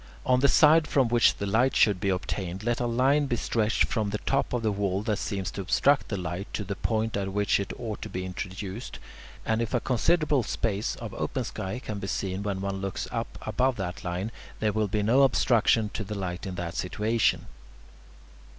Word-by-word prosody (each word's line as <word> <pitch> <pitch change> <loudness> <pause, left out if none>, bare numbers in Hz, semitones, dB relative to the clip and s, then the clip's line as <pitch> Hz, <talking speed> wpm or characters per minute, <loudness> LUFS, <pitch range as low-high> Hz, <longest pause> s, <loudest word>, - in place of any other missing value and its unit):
On 125 0 +4
the 140 - +4
side 155 +1 +6
from 130 -4 +2
which 120 0 +4
the 100 - -4
light 115 +7 +2
should 100 -4 +4
be 100 - 0
obtained 95 0 -3
let 120 +1 0
a 120 - 0
line 135 +5 +2
be 120 - 0
stretched 110 0 +1
from 110 -4 -1
the 105 - -1
top 135 +5 0
of 120 -2 -1
the 110 - +2
wall 100 -1 -1
that 105 -2 -1
seems 95 -4 -3
to 100 - -5
obstruct 140 +9 +3
the 100 - -3
light 90 +2 -5
to 105 - -2
the 100 0 -3
point 110 +2 -1
at 100 -1 -2
which 100 0 +2
it 100 - -3
ought 110 -3 -5
to - - -6
be 90 0 -4
introduced, 95 +4 -6 0.5
and 110 0 +1
if 115 +2 -1
a - - +3
considerable 140 +5 +2
space 105 -2 -2
of - - -7
open - - -2
sky 95 +5 -4
can 110 -5 -5
be 95 - -5
seen 95 0 -2
when 100 -2 -2
one 100 0 -3
looks 95 -1 -3
up - - -4
above 130 0 +1
that 95 -3 -5
line, 90 +4 -3 0.3
there 105 -1 +1
will 110 0 +1
be 105 +1 -1
no 120 +6 +4
obstruction 115 -5 +3
to 110 - -3
the 105 +1 -5
light 95 -1 -4
in 95 - -5
that 85 -1 -4
situation. 110 +6 0
105 Hz, 215 wpm, -27 LUFS, 95-120 Hz, 0.5 s, side